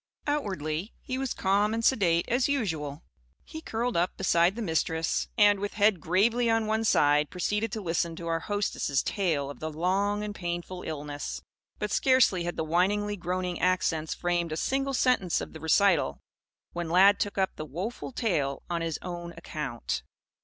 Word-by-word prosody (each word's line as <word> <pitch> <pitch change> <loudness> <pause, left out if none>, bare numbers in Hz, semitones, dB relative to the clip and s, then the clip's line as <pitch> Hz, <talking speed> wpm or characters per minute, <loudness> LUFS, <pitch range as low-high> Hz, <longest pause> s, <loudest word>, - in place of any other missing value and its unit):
Outwardly, 190 - -2
he 255 0 -4
was 270 -2 -2
calm 205 +3 +2
and 230 0 -1
sedate, 175 -9 +3
as 245 +1 +2
usual. 160 - -2 0.4
He 315 - -8
curled 240 -2 -2
up 175 +2 0
beside 175 0 +3
the 235 - -4
Mistress, 160 -2 0
and, 205 -2 +5
with 205 +1 -4
head 205 -3 +3
gravely 230 +7 +2
on 225 -1 +2
one 220 +1 0
side, 150 -5 +4
proceeded 210 +4 -1
to 220 - -3
listen 170 -2 -1
to 170 - -8
our 165 0 0
hostess' 200 -8 -1
tale 160 -9 -1
of - - -12
the 160 - -3
long 195 +6 0
and 210 -1 -4
painful 175 -1 -4
illness. 145 -3 -5 0.3
But, 210 -1 -3
scarcely 255 -10 +3
had 175 - -3
the - - 0
whiningly 205 +5 +1
groaning 180 -1 -3
accents 170 -3 +1
framed 175 -2 -1
a 155 - -2
single 270 +6 0
sentence 245 -10 +2
of - - -7
the 160 - -8
recital, 160 - +3 0.6
when 175 -1 -3
Lad 195 +4 +6
took 205 - -2
up 190 -1 0
the - - -5
woful 185 - -5
tale 160 - -1
on 170 -1 -1
his 165 -2 -2
own 175 -1 -6
account. 150 -8 -4
180 Hz, 175 wpm, -28 LUFS, 165-210 Hz, 0.6 s, Lad